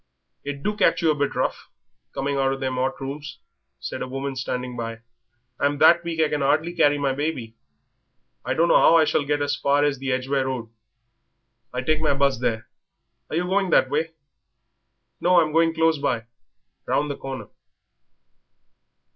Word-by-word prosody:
"It 140 0 -6
do 210 +1 -1
catch 210 - +2
you 160 - +4
a - - +2
bit 145 -1 -1
rough, - - -2 0.4
coming 140 +1 -2
out 135 -1 +1
of 135 - -6
them 130 -1 -2
'ot 130 +1 -1
rooms," 140 +2 -6 0.4
said 65 - -6
a - - -3
woman 135 +1 -4
standing 125 -1 -4
by 115 -1 -4
her. 115 - -24 0.6
"I'm 145 0 +1
that 170 +3 +6
weak 170 -1 -4
I 155 - +4
can 150 - -1
'ardly 155 +5 +1
carry 145 -4 +3
my 140 -2 0
baby. 130 -6 -3 0.9
I - - -2
dunno 170 +1 +3
'ow - - +6
I 160 -1 +6
shall 155 -1 +1
get 145 0 0
as 145 0 0
far 145 +1 +2
as 145 -3 0
the 135 0 -2
Edgware 130 +1 0
Road. 125 -3 -4 1.0
I 125 - -3
take 155 +3 +1
my 145 -3 +2
'bus 140 -3 +1
there. 115 -2 -2 0.6
Are - - -4
you 175 - +1
going 190 +1 +1
that - - +3
way?" 160 +3 -1 1.1
"No, 180 0 +4
I'm 155 -2 +1
going 165 0 +4
close 160 -1 +2
by, 115 -4 -1 0.6
round 145 0 0
the - - -4
corner." 135 -6 -7
140 Hz, 180 wpm, -23 LUFS, 130-155 Hz, 1.1 s, that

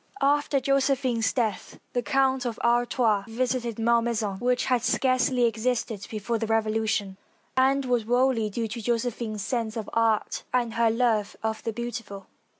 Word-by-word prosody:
After 285 0 +2
Josephine's 265 -3 +1
death 220 -7 -2
the 245 - +1
Count 265 -1 +1
of 235 -3 -3
Artois 235 -3 +2
visited 240 0 -2
Malmaison, 230 -3 +1
which 250 0 +1
had 250 -2 +2
scarcely 255 0 +2
existed 225 -2 -1
before 220 +1 -2
the 225 - -2
Revo 220 -1 +1
lution, 210 -3 -1 0.4
and 265 +1 +3
was 245 -2 +1
wholly 245 -2 +2
due 225 +2 -2
to 225 +2 -6
Josephine's 230 -2 -2
sense 230 0 -2
of 220 - -4
art 225 -2 +1
and 240 -3 0
her 230 0 +3
love 225 -3 +1
of 220 0 -2
the 225 - -3
beautiful. 225 -3 -6
235 Hz, 150 wpm, -26 LUFS, 220-250 Hz, 0.4 s, and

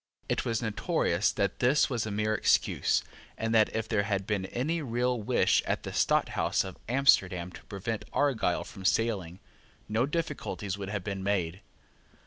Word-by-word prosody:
It - - -1
was 115 0 -1
notorious 105 - +1
that 100 -2 -1
this 135 +5 +4
was 120 -4 -2
a - - -3
mere 105 +1 0
excuse, 105 - +2 0.3
and 115 0 -1
that, 110 -1 +5
if 110 -1 -1
there 110 -3 +1
had 100 -2 -1
been 100 -3 -1
any 155 - -1
real 125 -2 0
wish 105 - +3
at - - -1
the - - -5
Stadthouse - - +2
of 95 -2 -9
Amsterdam 95 -9 +3
to - - -12
prevent 105 +2 -4
Argyle 140 -5 +1
from 100 -6 -11
sailing, 100 -4 0 0.5
no 110 +5 +1
difficulties 145 - -3
would 100 -1 -6
have 100 -2 -3
been 100 -1 -4
made. 95 -2 -1
110 Hz, 165 wpm, -29 LUFS, 95-120 Hz, 0.5 s, that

